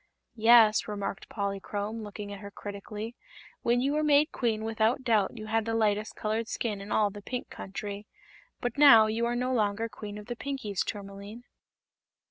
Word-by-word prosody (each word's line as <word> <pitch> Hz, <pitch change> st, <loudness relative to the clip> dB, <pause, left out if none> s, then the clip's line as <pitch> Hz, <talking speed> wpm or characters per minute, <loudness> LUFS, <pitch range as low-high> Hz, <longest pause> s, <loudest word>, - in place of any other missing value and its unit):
"Yes," 225 Hz, -1 st, +6 dB
remarked 200 Hz, -2 st, -4 dB
Polychrome, 205 Hz, +2 st, -3 dB
looking 205 Hz, -1 st, -7 dB
at 200 Hz, -, -8 dB
her 200 Hz, 0 st, -8 dB
critically, 210 Hz, +3 st, -7 dB, 0.5 s
"when 240 Hz, +1 st, +2 dB
you 275 Hz, +3 st, +1 dB
were 305 Hz, -, +1 dB
made 300 Hz, 0 st, +4 dB
Queen 225 Hz, -3 st, -1 dB
without 225 Hz, +3 st, +1 dB
doubt 225 Hz, -2 st, +2 dB
you 215 Hz, -, -7 dB
had 225 Hz, +1 st, +1 dB
the 225 Hz, 0 st, -1 dB
lightest 215 Hz, -1 st, +1 dB
colored 220 Hz, +1 st, -2 dB
skin 210 Hz, -4 st, -3 dB
in 200 Hz, -, -8 dB
all 210 Hz, -2 st, +3 dB
the 205 Hz, +1 st, -9 dB
Pink 250 Hz, +4 st, -5 dB
Country. 200 Hz, +1 st, -6 dB, 0.5 s
But 245 Hz, +2 st, -3 dB
now 235 Hz, -7 st, +9 dB
you 225 Hz, +2 st, 0 dB
are 240 Hz, -, -1 dB
no 250 Hz, +1 st, 0 dB
longer 215 Hz, -1 st, +1 dB
Queen 210 Hz, -2 st, -8 dB
of 210 Hz, -, -9 dB
the 240 Hz, -, -5 dB
Pinkies, 235 Hz, -8 st, -3 dB
Tourmaline." 200 Hz, +2 st, -7 dB
220 Hz, 175 wpm, -29 LUFS, 205-235 Hz, 0.5 s, now